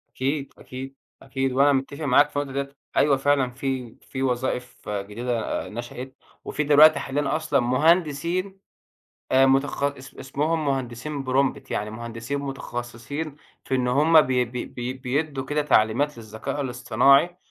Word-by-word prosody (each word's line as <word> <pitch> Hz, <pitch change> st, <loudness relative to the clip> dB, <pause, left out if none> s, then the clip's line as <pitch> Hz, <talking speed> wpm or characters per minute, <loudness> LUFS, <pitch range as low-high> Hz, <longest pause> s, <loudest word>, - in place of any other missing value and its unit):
أكيد، 135 Hz, +2 st, -2 dB
أكيد، 135 Hz, +1 st, -8 dB, 0.3 s
أكيد، 135 Hz, 0 st, -2 dB
وأنا 140 Hz, +3 st, +4 dB
متفق 140 Hz, +3 st, -2 dB
معاك 145 Hz, +1 st, +4 dB
في 145 Hz, -, -2 dB
اللي 140 Hz, -1 st, -4 dB
قلته -, -, +1 dB
ده. 140 Hz, -, -36 dB, 0.2 s
أيوه، 140 Hz, -2 st, +4 dB
فعلًا 135 Hz, -2 st, +2 dB
في 130 Hz, -2 st, -4 dB
في 130 Hz, -1 st, -5 dB
وظائف 125 Hz, -2 st, -2 dB
جديدة 105 Hz, +4 st, -3 dB, 0.3 s
آآ، -, -, -9 dB
نشأت، 120 Hz, +3 st, -7 dB, 0.3 s
وفي 150 Hz, -, -2 dB
دلوقتي 150 Hz, +2 st, +7 dB
حاليًا 140 Hz, +1 st, -1 dB
أصلًا 155 Hz, -, +1 dB
مهندسين 165 Hz, +8 st, +1 dB, 0.7 s
آآ، 135 Hz, +1 st, +6 dB
متخ 135 Hz, +1 st, +1 dB
اس 140 Hz, -1 st, -3 dB
اسمهم 155 Hz, +4 st, -1 dB
مهندسين 135 Hz, +1 st, -3 dB
prompt، 135 Hz, +1 st, +1 dB
يعني 105 Hz, +1 st, -2 dB
مهندسين 115 Hz, +4 st, -5 dB
متخصصين 135 Hz, +2 st, -5 dB, 0.3 s
في 130 Hz, -, -2 dB
إن 125 Hz, -1 st, +1 dB
هم 155 Hz, +5 st, +6 dB
بي 125 Hz, -3 st, +1 dB
بي 125 Hz, +1 st, -5 dB
بي 125 Hz, +1 st, -5 dB
بيدوا 135 Hz, +2 st, -2 dB
كده 150 Hz, +2 st, 0 dB
تعليمات 135 Hz, +1 st, +2 dB
للذكاء 110 Hz, +6 st, -5 dB
الاصطناعي، 140 Hz, +5 st, +3 dB
135 Hz, 145 wpm, -24 LUFS, 125-145 Hz, 0.7 s, دلوقتي